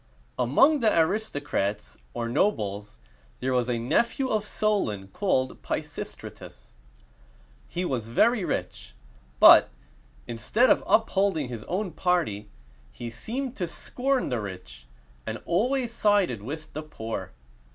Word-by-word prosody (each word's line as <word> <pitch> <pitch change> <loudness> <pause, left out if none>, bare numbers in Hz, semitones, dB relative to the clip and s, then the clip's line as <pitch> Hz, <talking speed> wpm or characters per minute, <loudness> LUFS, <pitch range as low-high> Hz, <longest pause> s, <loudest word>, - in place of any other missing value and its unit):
Among 270 - +4
the 225 -4 +3
aristocrats, 145 - -1 0.2
or 120 -1 -2
nobles, 105 - -1 0.4
there 130 +1 -1
was 125 -1 +1
a 120 - 0
nephew 235 - +1
of 215 -2 0
Solon 110 - -1
called 130 - -1
Pi - - -2
sis´tra - - -8
tus. - - -14 1.0
He 180 +1 -2
was 125 -8 -2
very 215 - +3
rich; - - -4 0.4
but, - - +9 0.6
instead 210 - +2
of - - +3
upholding 195 - +2
his 115 -3 -6
own 190 +1 -2
party, 155 - 0 0.4
he 120 -1 -7
seemed 245 - -4
to 180 - -2
scorn 260 +9 -1
the 120 -3 -1
rich, 80 -12 -9 0.4
and - - -3
always 240 +7 0
sided 205 - +2
with 155 +7 -7
the 155 - -4
poor. 115 -7 -6
155 Hz, 130 wpm, -26 LUFS, -, 1.0 s, but